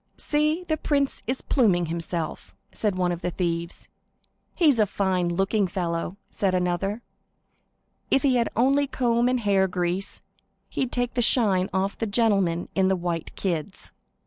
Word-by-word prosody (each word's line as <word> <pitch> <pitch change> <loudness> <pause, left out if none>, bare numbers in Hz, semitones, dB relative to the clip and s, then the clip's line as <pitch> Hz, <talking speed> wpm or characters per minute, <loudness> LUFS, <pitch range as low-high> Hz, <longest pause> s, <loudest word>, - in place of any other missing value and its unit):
"See, 305 +3 0
the 315 -3 -1
prince 280 -2 0
is 255 +2 -2
pluming 195 -10 +2
himself," 165 - -4 0.2
said 210 -4 -1
one 180 -1 +1
of 175 0 -4
the 180 - -1
thieves. 170 -1 -3 0.7
"He's 300 -9 +4
a 210 - +4
fine 185 -3 0
looking 195 +3 +1
fellow," 175 0 -3
said 190 -2 0
another; 185 +5 -1 1.1
"if 270 - +3
he 270 -3 +3
had 235 - +1
only 275 +4 +3
a - - -10
comb 240 -2 +1
and 255 -1 0
hair 195 -2 +3
grease, 180 +1 -2 0.5
he'd 260 -2 -2
take 245 -1 -1
the 245 - +1
shine 200 -6 +3
off 190 +1 -1
the 225 - -1
gentlemen 200 -6 +2
in 190 -1 +2
white 170 -2 -3
kids." 180 0 -3
195 Hz, 155 wpm, -25 LUFS, 175-245 Hz, 1.1 s, He's